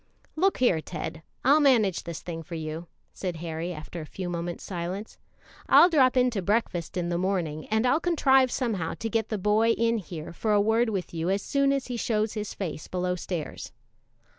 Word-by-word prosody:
"Look 380 +5 +2
here, 185 -11 +3
Ted, 165 -1 -6 0.2
I'll 285 +4 +6
manage 230 - +3
this 170 -1 -6
thing 165 -2 -5
for 165 +2 -8
you," 160 +1 -5 0.3
said 180 -3 -4
Harry, 165 +1 -4
after 165 +1 -7
a - - -7
few 185 +2 -5
moments' 170 0 -4
silence. 185 +3 -5 0.5
"I'll 350 - +8
drop 260 -4 +4
in 250 0 +4
to 205 -4 -2
breakfast 185 -4 -1
in 175 -1 -1
the 175 0 0
morning, 175 -5 -1
and 220 +2 +1
I'll 275 +5 +3
contrive 270 -7 +4
somehow 210 -10 -1
to 225 - -4
get 225 0 0
the 215 - -1
boy 215 +4 +3
in 230 0 +1
here 170 -4 -8
for 215 +4 0
a 205 - +5
word 225 +3 +3
with 195 -5 -3
you 165 +1 -1
as 195 +1 0
soon 275 0 +2
as 275 -1 0
he 245 -1 -4
shows 215 -2 0
his 210 -1 -4
face 170 -5 -5
below 180 0 -1
stairs." 175 -3 -5
195 Hz, 200 wpm, -27 LUFS, 170-230 Hz, 0.5 s, I'll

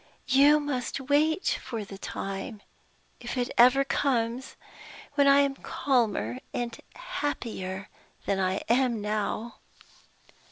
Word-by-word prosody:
You 280 +3 +6
must 275 -4 -3
wait 295 +6 +1
for 225 -5 -5
the 195 0 -10
time 195 +3 -5 0.6
if 240 +2 -5
it 245 0 -1
ever 255 +3 +6
comes! 250 -3 -1 0.6
when 285 -1 +4
I 280 0 +7
am 280 -1 +1
calmer 220 - 0 0.2
and 240 -1 -2 0.2
happier 225 - -4 0.4
than 195 - 0
I 190 +1 0
am 240 -1 +2
now." 215 +2 -3
245 Hz, 115 wpm, -28 LUFS, 210-275 Hz, 0.6 s, I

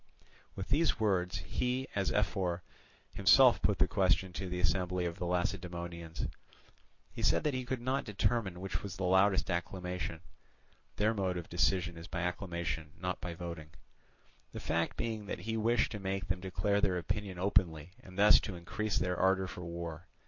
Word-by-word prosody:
With 95 - -5
these 150 0 +2
words 95 -4 +1
he, 125 +1 -1
as 100 -1 0
ephor, 95 -4 0 0.5
himself - - +6
put - - +2
the - - +4
question 95 -1 +2
to 95 +1 -4
the 90 0 -3
assembly 90 +1 +1
of 85 +2 -4
the 90 - -2
Lacedaemonians. 85 -2 -3 0.9
He - - -7
said - - +3
that 150 - +1
he 130 -1 -2
could 125 -1 -2
not 130 +3 0
determine 105 -3 0
which 95 - -3
was 100 -2 -6
the 95 - -3
loudest 95 +1 +3
acclamation 90 -1 -3 0.7
(their 110 +2 +2
mode 95 -4 -1
of 85 - -6
decision 90 0 +1
is 85 +1 -9
by 90 - -3
acclamation 85 -4 -3
not 90 0 -3
by 85 -1 -4
voting); 85 -3 -6 0.8
the - - -5
fact 85 0 -1
being 110 -3 -3
that - - -4
he 110 0 -2
wished 115 +1 +2
to 105 - -4
make 95 -1 -3
them 95 0 0
declare 100 +2 0
their 95 -3 +2
opinion 95 +1 -3
openly 90 -4 +1
and 95 0 -13
thus 105 +1 +8
to 95 - -5
increase 100 +5 -2
their 90 -1 0
ardour 95 0 +3
for 90 - -7
war. 85 0 -6
90 Hz, 175 wpm, -33 LUFS, 85-100 Hz, 0.9 s, thus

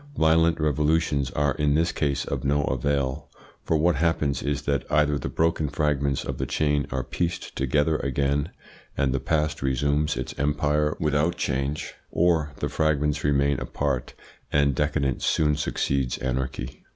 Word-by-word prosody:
Violent 80 +1 +3
revolutions 75 -2 +1
are 70 +1 0
in 75 0 +1
this 85 +2 +2
case 70 -2 -1
of 70 -2 -3
no 70 +1 +2
avail; 70 +1 -1 0.3
for 80 - +1
what 80 -1 +2
happens 75 -3 +1
is 70 +1 -2
that 70 -2 0
either 75 -1 +3
the - - -4
broken 80 -2 0
fragments 70 -2 0
of - - -4
the - - -1
chain 75 -2 +1
are - - -2
pieced 85 0 -3
together 75 +4 +1
again 70 +3 0 0.5
and 65 -2 +1
the 70 - 0
past 75 +1 -1
resumes 70 +3 +1
its - - -4
empire 75 +1 +1
without 75 +2 +1
change, 70 +3 -2 0.2
or 80 -3 +2
the - - +1
fragments 75 -1 0
remain 70 -1 +2
apart 70 -4 -2 0.4
and 70 -1 +3
decadence 70 -2 0
soon 75 -2 +2
succeeds 70 -3 -1
anarchy. 65 0 -4
75 Hz, 150 wpm, -25 LUFS, 70-75 Hz, 0.5 s, Violent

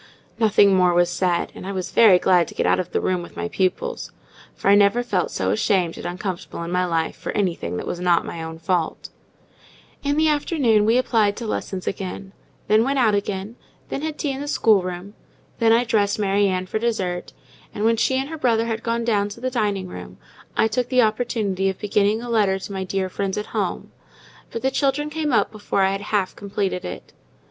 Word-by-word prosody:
Nothing 205 -3 +5
more 180 -1 +3
was 175 0 +3
said; 175 -1 0
and 185 - -9
I - - -3
was 185 -2 -4
very 215 -6 +7
glad 180 -2 +3
to - - -11
get - - 0
out - - +3
of 180 -1 -3
the - - +1
room 185 -1 0
with 175 - -11
my 215 - -2
pupils; 215 - -2 0.4
for - - -4
I - - +7
never 205 +4 +4
felt 195 -7 0
so 95 0 -1
ashamed 175 - +1
and - - -6
uncomfortable 180 -1 -5
in 170 - -5
my 180 0 +1
life 165 -2 -1
for - - -5
anything 170 - -1
that - - -4
was 175 - -4
not 175 -1 +2
my 165 - -6
own 160 0 -6
fault. 165 0 -2 0.9
In 285 0 0
the 315 0 +4
afternoon 280 -8 +2
we 225 +3 +4
applied 220 -5 +2
to 235 - -5
lessons 190 -3 -4
again: 195 0 -5 0.3
then 215 +2 +4
went 275 +3 0
out 230 -5 +3
again; 200 +2 -3 0.3
then - - -3
had 310 -1 -4
tea 290 - -1
in 270 +1 -5
the 290 - -5
schoolroom; 195 -6 +1 0.5
then 225 -1 +4
I 230 +2 +5
dressed 210 -4 +1
Mary 200 -1 +2
Ann 185 -1 -1
for 215 - -3
dessert; 190 -6 -2 0.4
and 210 - -3
when 230 0 +4
she 260 +3 +1
and 265 +1 -1
her 320 -1 -6
brother 230 -4 +2
had 225 -1 -3
gone 230 0 -1
down 205 -3 +1
to 205 - -10
the 255 +1 -2
dining 205 -6 -1
room, - - -9 0.4
I - - +4
took 245 +3 -1
the 255 -2 +4
opportunity 215 -4 0
of 190 - -4
beginning 210 +2 +1
a 240 - -6
letter 205 -4 +2
to 195 +1 -8
my 190 -1 -3
dear 190 0 -2
friends 195 +1 -3
at 210 - -2
home: - - -2 0.6
but 230 - -6
the 265 - +2
children 290 +2 0
came 310 -1 -1
up 230 - +2
before 205 -2 -1
I 190 - +3
had 195 0 -3
half 205 -2 -1
completed 195 -2 -3
it. 90 - -8
205 Hz, 220 wpm, -22 LUFS, 185-230 Hz, 0.9 s, very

